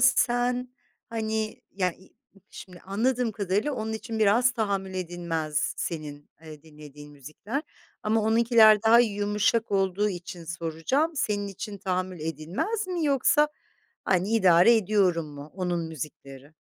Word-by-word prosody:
sen, 250 0 +2 0.4
hani, 220 -2 -3
ya 185 -2 0
i 190 - -21 0.4
şimdi 180 -2 -11
anladığım 230 +4 0
kadarıyla 200 +7 -1
onun 220 -3 -3
için 220 0 -5
biraz 230 +4 +4
tahammül 200 -5 -2
edilmez 170 -4 -2
senin, 150 -3 -6
eee, 155 -2 -11
dinlediğin 150 -2 -13
müzikler 155 - -6 0.4
ama 220 +1 +1
onunkiler 220 -1 +5
daha 225 +1 +6
yumuşak 210 0 +1
olduğu 195 +1 +1
için 180 -2 -7
soracağım, 170 - -1
senin 205 -6 -1
için 200 +1 -7
"tahammül 185 -2 -3
edilmez" 165 - -3
mi 355 -3 -2
yoksa, 295 +2 +3 0.6
hani, 190 +1 +1
"idare 185 +3 +6
ediyorum" 185 -6 +1
mu 145 +2 -10
onun 175 -3 -2
müzikleri? 145 -1 -9
200 Hz, 125 wpm, -26 LUFS, 170-225 Hz, 0.6 s, daha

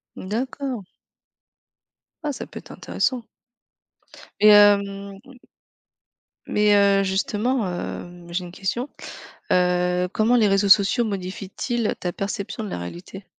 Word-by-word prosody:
D'accord! 245 +2 -4 1.4
Ah 300 - -1
ça - - -7
peut - - -9
être - - -14
intéressant. 255 -3 -2 1.2
Et 215 - +7
hem 200 -1 +4 1.3
Mais, 210 0 +3
heu, 200 -1 +4
justement, 210 +4 0
hem, 175 -1 -7
j'ai 180 +2 -2
une 175 - -10
question, 200 +9 -3 0.6
heu, 180 0 +2
comment 225 +3 +3
les 220 -3 +4
réseaux 195 +1 +2
sociaux 200 +5 +5
modifient-ils 200 +3 -3
ta 180 - -2
perception 200 +3 -4
de 205 - -6
la - - -4
réalité? 175 - -9
200 Hz, 115 wpm, -23 LUFS, 185-215 Hz, 1.4 s, Et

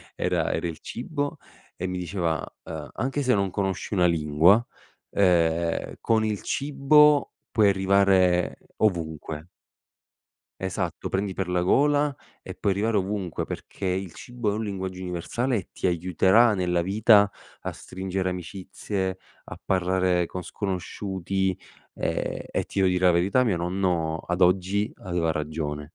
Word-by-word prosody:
era - - 0
era 85 - -1
il 80 -1 -6
cibo, 145 +4 -4 0.4
e 95 - -3
mi 90 0 -3
diceva: 85 -3 -2 0.2
"Ehm, 80 -2 -7
anche 135 +4 -1
se 125 - +3
non 100 -2 +1
conosci 95 +1 -2
una 90 -2 +4
lingua, 85 +7 +4 0.5
ehm, 85 -3 +2
con 110 -1 +2
il 105 -2 -2
cibo 145 +1 +4 0.2
puoi 105 -3 +4
arrivare 95 -2 +3 0.2
ovunque". 80 -5 -1 1.1
Esatto, 95 -2 -3
"prendi 95 0 -1
per 95 -1 -3
la 90 0 +1
gola 145 +8 +3 0.3
e - - -8
puoi 100 - 0
arrivare 105 +2 +1
ovunque, 95 -3 -2
perché 100 - -7
il 95 -1 -1
cibo 120 -3 -4
è - - 0
un 110 0 -2
linguaggio 95 -2 -4
universale 95 +8 -2
e 95 - -3
ti - - -2
aiuterà 95 +6 +4
nella 90 -2 +1
vita 105 +2 +5 0.3
a - - -4
stringere 95 0 -4
amicizie, 95 +1 -4 0.3
a - - -9
parlare 90 -1 +1
con 90 +2 -6
sconosciuti" 95 0 -2 0.4
ehm, - - -2
e - - 0
ti 100 - -4
devo 95 -1 +4
dire 90 0 +1
la 90 - +7
verità, 100 +9 +3
mio 100 -6 +2
nonno, 85 -2 0
ad 90 +1 -1
oggi, 95 +3 +2
aveva 85 -4 -1
ragione. 75 -1 -4
95 Hz, 145 wpm, -25 LUFS, 90-105 Hz, 1.1 s, la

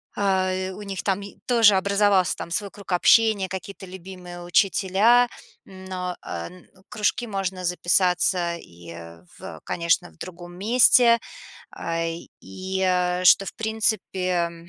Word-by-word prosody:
а, 185 -1 0
у 200 - -10
них, 195 -2 -6
е - - -4
там 195 0 -1 0.3
тоже 230 -5 +5
образовался 200 -1 +2
там 170 - -8
свой 200 +3 -1
круг 200 -2 -12
общения, 205 +2 +4
какие-то 190 +1 -8
любимые 180 -1 -10
учителя. 195 +6 +3 0.4
М, 190 -1 -13
но, 180 -1 -4
э, - - -5
н 180 0 -16 0.2
кружки 210 +3 -1
можно 190 -3 -4
записаться 180 0 +1
и 85 - -14 0.5
в, - - -18
э, - - -8
конечно, 170 0 0
в 80 - -25
другом 175 - -10
месте. 235 +2 +5 0.5
А, 165 0 -4 0.4
и, 190 0 -6
а, 180 -1 +1
что, 195 - +6
в - - -7
принципе, 220 -4 -1 0.2
м, 170 0 -14
190 Hz, 145 wpm, -23 LUFS, 180-200 Hz, 0.5 s, что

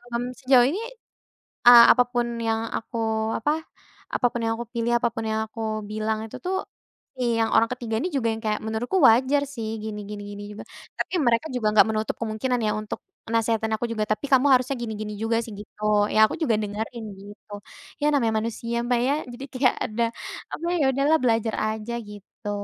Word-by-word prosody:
mmm, 240 - 0 0.2
sejauh 255 -2 +6
ini, 365 +9 -2 0.9
eee, 240 -1 +11
apa 250 - +4
pun 240 -1 +1 0.2
yang 225 -1 0 0.2
aku 230 - -7 0.4
apa, 295 +6 +1 0.6
apa - - 0
pun 240 - -3
yang 225 0 +1
aku 235 - -5
pilih, 235 0 0
apa 235 - +2
pun 225 -2 -4
yang 220 0 0
aku 225 +1 -8 0.3
bilang 215 +1 -2
itu, - - -11
tuh, 380 +1 -1 0.5
si 240 -2 0
yang 225 - +3
orang 230 - +5
ketiga 240 -3 -3
ini 355 +8 -1
juga 260 -5 0
yang 220 - -6
kayak, 215 -1 0
"Menurutku 225 +11 -1
wajar, 260 +5 +4
sih, 225 -5 -5
gini 210 -1 -5
gini 205 -1 -6
gini 205 - -8
juga." 210 - -8 0.4
Tapi - - -2
mereka 235 +2 +2
juga 225 -4 0
nggak 215 - +7
menutup 215 -1 -1
kemungkinan 230 +3 -1
ya 215 - +1
untuk 215 0 -5 0.3
nasehatin 225 -1 +1
aku 230 - -3
juga, 215 -2 -1
"Tapi 215 +6 -1
kamu 265 +1 +5
harusnya 255 +1 +3
gini 230 -2 -4
gini 210 0 -4
juga, 225 +1 0
sih." 225 - -9
Gitu. 210 +1 -13 0.3
Ya, 220 0 +6
aku - - -5
juga 285 -9 +2
dengerin, 220 +3 -4 0.2
gitu. 205 +1 -13 0.5
Ya, - - +1
namanya 235 -6 +2
manusia, 230 +1 -4
Mbak, 245 0 +1
ya 280 - +2 0.2
jadi 265 +3 -7
kayak 255 0 +2
ada 225 +2 -1 0.5
apa, 335 - -4
ya, 285 - +3
udahlah 280 +4 +3
belajar 225 -2 +1 0.2
aja, 220 +2 -5
gitu. 205 0 -10
230 Hz, 195 wpm, -25 LUFS, 220-250 Hz, 0.9 s, eee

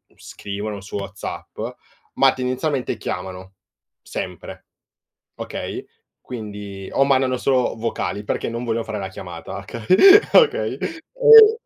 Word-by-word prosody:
scrivono 100 0 -6
su 100 +1 -6
WhatsApp, 100 -1 -7 0.6
ma, 135 -1 +5
tendenzialmente, 130 +2 -2
chiamano. 95 +1 -6 0.5
Sempre. - - -7 0.7
Okay? - - -6 0.4
Quindi 105 -4 -8
o 135 - +4
mandano 130 -2 +2
solo 130 -1 +1
vocali 110 -2 -3
perché - - -2
non 115 +1 -4
vogliono 115 0 -1
fare 105 - -4
la 95 - -4
chiamata, 95 - -8
oka 115 -2 -8 0.5
okay? 460 -3 +4
E 450 +5 +5
115 Hz, 115 wpm, -21 LUFS, 100-135 Hz, 0.7 s, ma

